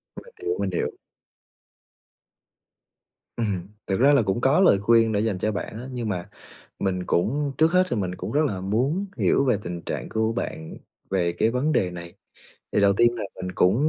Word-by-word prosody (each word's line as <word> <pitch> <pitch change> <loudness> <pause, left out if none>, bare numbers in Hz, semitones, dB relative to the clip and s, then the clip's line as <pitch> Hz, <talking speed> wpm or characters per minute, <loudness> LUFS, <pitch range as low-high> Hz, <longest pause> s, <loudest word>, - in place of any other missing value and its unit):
Mình 485 - -11
hiểu, 425 +2 0
mình - - 0
hiểu. 450 -2 -2 2.4
Ừm. 100 -6 -2 0.2
Thực 95 +2 0
ra 140 +3 +6
là 140 - +5
cũng 105 +3 -1
có 135 +6 +4
lời 140 - +5
khuyên 115 +1 +4
để 100 - +1
dành 105 -3 0
cho 110 - 0
bạn 105 - -5
á, 125 - -7
nhưng 120 -3 -3
mà 90 -2 -4 0.5
mình 90 -1 -1
cũng 140 +10 0
trước 160 +1 +4
hết 185 0 +5
thì 120 - 0
mình 90 -3 -2
cũng - - -6
rất 150 - +2
là 95 -7 -2
muốn 130 - 0
hiểu 140 - +2
về 125 -6 +3
tình 85 -1 -5
trạng - - -5
của 110 +1 0
bạn 80 -8 -5 0.3
về 90 -3 +1
cái 110 +6 +1
vấn 135 +5 0
đề 90 -10 +1
này. 85 0 -9 0.6
Thì - - +2
đầu 100 0 +5
tiên 120 0 +4
là 110 - -4
mình 90 0 -5
cũng, 95 +3 +3
110 Hz, 200 wpm, -24 LUFS, 95-135 Hz, 2.4 s, ra